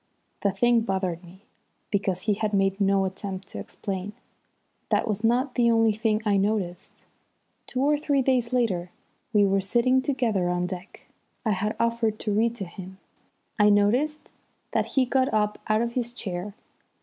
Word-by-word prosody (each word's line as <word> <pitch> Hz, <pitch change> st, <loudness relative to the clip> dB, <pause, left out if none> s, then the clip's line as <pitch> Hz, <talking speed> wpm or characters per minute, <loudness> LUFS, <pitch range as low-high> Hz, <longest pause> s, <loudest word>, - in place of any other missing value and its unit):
The 200 Hz, -, +2 dB
thing 235 Hz, +4 st, +3 dB
bothered 190 Hz, -5 st, -2 dB
me, 185 Hz, +3 st, -16 dB, 0.5 s
because 195 Hz, -3 st, 0 dB
he 210 Hz, +1 st, +1 dB
had 210 Hz, 0 st, -1 dB
made 195 Hz, 0 st, +1 dB
no 195 Hz, 0 st, +3 dB
attempt 190 Hz, 0 st, -5 dB
to -, -, -6 dB
explain. 195 Hz, +1 st, -5 dB, 0.8 s
That -, -, +1 dB
was 210 Hz, 0 st, -2 dB
not 250 Hz, +4 st, +2 dB
the 240 Hz, -2 st, +3 dB
only 225 Hz, -1 st, +4 dB
thing 220 Hz, 0 st, 0 dB
I 205 Hz, -2 st, +3 dB
noticed. 195 Hz, -3 st, -2 dB, 0.6 s
Two 255 Hz, -, -2 dB
or 295 Hz, +1 st, +3 dB
three 285 Hz, -3 st, +1 dB
days 250 Hz, -2 st, +1 dB
later 200 Hz, -9 st, 0 dB, 0.4 s
we 210 Hz, -2 st, +4 dB
were 195 Hz, 0 st, +2 dB
sitting 245 Hz, +6 st, +3 dB
together 235 Hz, -10 st, 0 dB
on 180 Hz, 0 st, 0 dB
deck. 180 Hz, +1 st, -8 dB, 0.4 s
I 220 Hz, -, +2 dB
had 205 Hz, +2 st, -1 dB
offered 230 Hz, -2 st, +1 dB
to 210 Hz, -, -1 dB
read 230 Hz, +3 st, +2 dB
to 200 Hz, -5 st, -5 dB
him. 185 Hz, +2 st, -10 dB, 0.6 s
I 210 Hz, 0 st, +6 dB
noticed 245 Hz, +10 st, +2 dB, 0.4 s
that -, -, 0 dB
he 260 Hz, -, +5 dB
got 260 Hz, +1 st, +1 dB
up 210 Hz, -1 st, 0 dB
out 215 Hz, +2 st, +2 dB
of 235 Hz, -, -2 dB
his 240 Hz, -1 st, -2 dB
chair. 195 Hz, -2 st, -4 dB
210 Hz, 170 wpm, -26 LUFS, 195-235 Hz, 0.8 s, I